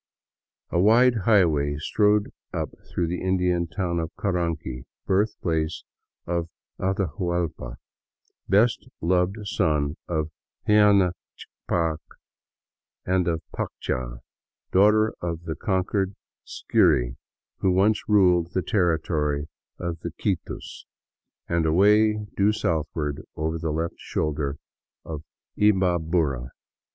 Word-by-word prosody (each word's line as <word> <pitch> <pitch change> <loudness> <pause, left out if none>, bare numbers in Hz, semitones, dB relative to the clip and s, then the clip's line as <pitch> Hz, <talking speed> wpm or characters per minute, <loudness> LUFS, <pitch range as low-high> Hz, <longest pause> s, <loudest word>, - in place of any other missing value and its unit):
A 85 - +1
wide 115 +6 +6
highway 80 -9 +3
strode 105 +6 +2 0.2
up - - -3 0.2
through 85 - -1
the 90 +2 -3
Indian 90 -2 +1
town 85 +1 -2
of 80 -1 -2
Caranqui, 85 -9 -2 0.2
birthplace 85 -5 0 0.4
of 85 -1 -2 0.3
Atahuallpa, 85 - -2 0.7
best 110 +4 +3
loved 90 +3 +1
son 80 -7 0
of 80 -2 -2 0.4
Huayna 105 -3 +5 0.3
Ccapac 80 -2 -2 1.1
and 90 -1 +1
of 80 -1 -1
Paccha, - - -4 0.5
daughter 105 +3 +4
of 85 -1 -3
the 80 -2 -3
conquered 95 +2 -1 0.3
Scyri - - +2 0.4
who 95 - +2
once 100 +5 +2
ruled 90 -4 +4
the 95 - 0
territory 80 -5 0 0.3
of 85 -1 -4
the 85 - -4
Quitus, 95 -5 -3 0.6
and 85 -1 +1
away 105 +5 +4
due 100 +2 +3
south 85 -8 0
ward 75 -2 -2
over 80 +1 -2
the 80 - -2
left 80 +2 -2
shoulder 75 -2 -2 0.5
of 75 -3 -5 0.4
Imbabura. 85 -10 +2
85 Hz, 105 wpm, -25 LUFS, 80-95 Hz, 1.1 s, wide